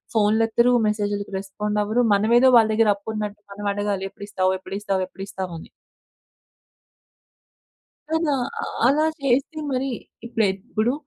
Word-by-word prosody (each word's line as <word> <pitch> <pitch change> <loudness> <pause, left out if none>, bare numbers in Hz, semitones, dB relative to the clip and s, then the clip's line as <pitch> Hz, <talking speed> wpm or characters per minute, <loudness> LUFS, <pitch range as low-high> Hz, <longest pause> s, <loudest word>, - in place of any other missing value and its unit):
ఫోన్‌లు 215 +1 +3
ఎత్తరు. 235 +2 +3
మెసేజులకి 205 -1 -2
రెస్పాండ్ 210 +2 -2
అవ్వరు. 220 +4 +1
మనమేదో 235 +6 +5
వాళ్ళ 220 -1 +5
దగ్గర 220 0 +3
అప్పు 200 +2 -10
ఉన్నట్టు 210 -1 -4
మనం 205 +1 -5
అడగాలి. 200 -1 -2
ఎప్పుడు 200 - -9
ఇస్తావు? 185 -2 +1
ఎప్పుడు 195 +1 -6
ఇస్తావు? 195 -2 0
ఎప్పుడు 195 - -9
ఇస్తావు? 190 -3 -5
అని. - - -13 2.4
కదా! 320 -2 +1 0.3
అ - - -3 0.2
అలా 295 +4 +3 0.2
చేస్తే 275 +4 +1
మరి 260 +1 0 0.4
ఇప్పుడైతే 210 -5 0
ఇప్పుడు 225 +3 +1
210 Hz, 140 wpm, -23 LUFS, 200-235 Hz, 2.4 s, మనమేదో